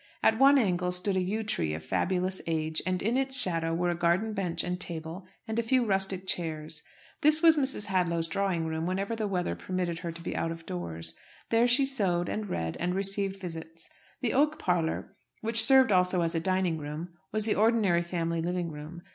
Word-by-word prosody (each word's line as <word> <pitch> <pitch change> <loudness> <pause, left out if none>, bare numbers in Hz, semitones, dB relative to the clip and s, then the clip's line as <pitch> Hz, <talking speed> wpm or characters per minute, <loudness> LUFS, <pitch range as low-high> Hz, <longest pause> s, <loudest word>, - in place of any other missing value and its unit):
At 220 +1 +4
one 275 +1 +7
angle 180 -6 +1
stood 180 +2 -1
a 185 - +2
yew 210 +5 -2
tree 80 - -1
of 80 - -7
fabulous 185 - -1
age, 160 -1 0
and 185 -1 -1
in 230 +5 +1
its 265 0 +4
shadow 165 -6 +4
were 175 +1 +1
a - - -2
garden 175 +6 +1
bench 180 -4 -1
and 180 0 -3
table, 165 +2 -5 0.2
and 220 +1 -1
a - - +3
few 245 +2 +2
rustic 195 -2 -1
chairs. 155 -4 -2 0.4
This 305 +2 +4
was 325 -1 +7
Mrs. 270 -7 0
Hadlow's 175 -4 +1
drawing 180 -1 -1
room 160 +1 -2
whenever 195 +4 -2
the 220 -2 -2
weather 180 -3 -1
permitted 180 -2 -3
her 170 -1 -4
to 165 0 -10
be - - -4
out 165 - -1
of 165 0 -8
doors. 85 -2 -5 0.4
There 230 +1 +4
she 250 +3 +4
sewed, 190 -10 0
and 215 -2 -3
read, 80 - -3
and 180 +1 -1
received 195 0 -1
visits. 165 -2 -8 0.3
The 240 -4 0
oak 300 +3 +2
parlour, 175 - -1 0.3
which 225 0 +1
served 265 -2 +6
also 180 -1 +3
as 165 0 0
a 165 - 0
dining 185 -1 0
room, 150 +4 -6 0.2
was 215 0 0
the 220 - +2
ordinary 210 -5 +3
family 170 -1 -2
living 175 0 -2
room. 155 +3 -9
180 Hz, 205 wpm, -29 LUFS, 165-215 Hz, 0.4 s, one